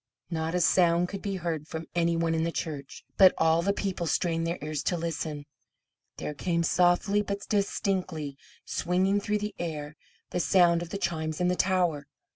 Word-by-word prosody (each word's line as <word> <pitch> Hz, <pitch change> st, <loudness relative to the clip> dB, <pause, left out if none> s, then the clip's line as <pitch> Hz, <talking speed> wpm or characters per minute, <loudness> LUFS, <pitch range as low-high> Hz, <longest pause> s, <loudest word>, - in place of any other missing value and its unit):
Not 160 Hz, +1 st, -2 dB
a -, -, +2 dB
sound 175 Hz, 0 st, +4 dB
could 200 Hz, -1 st, -6 dB
be 200 Hz, -1 st, -3 dB
heard 165 Hz, -4 st, -3 dB
from 160 Hz, 0 st, -5 dB
any 170 Hz, -1 st, +1 dB
one 165 Hz, 0 st, +1 dB
in 160 Hz, -, +1 dB
the 170 Hz, -, 0 dB
church, 145 Hz, -2 st, -5 dB
but 190 Hz, -2 st, +8 dB
as -, -, -25 dB
all 160 Hz, +1 st, +3 dB
the 200 Hz, +3 st, +1 dB
people 190 Hz, -4 st, -2 dB
strained 165 Hz, 0 st, 0 dB
their 170 Hz, +1 st, -2 dB
ears 150 Hz, -1 st, -3 dB
to 175 Hz, -, +1 dB
listen, 160 Hz, -3 st, -4 dB, 0.7 s
there 150 Hz, -, -4 dB
came 170 Hz, +3 st, 0 dB
softly, 180 Hz, +4 st, +3 dB
but 200 Hz, -1 st, -4 dB
distinctly, 185 Hz, -7 st, -1 dB, 0.3 s
swinging 190 Hz, +3 st, +1 dB
through 210 Hz, +1 st, 0 dB
the 210 Hz, 0 st, -4 dB
air, 150 Hz, -3 st, -4 dB, 0.4 s
the 180 Hz, -, -1 dB
sound 170 Hz, -1 st, +4 dB
of 175 Hz, -, -6 dB
the 200 Hz, -, -3 dB
chimes 160 Hz, -4 st, -2 dB
in 180 Hz, 0 st, +2 dB
the 180 Hz, -, +1 dB
tower. 180 Hz, -6 st, +1 dB
170 Hz, 190 wpm, -28 LUFS, 160-185 Hz, 0.7 s, but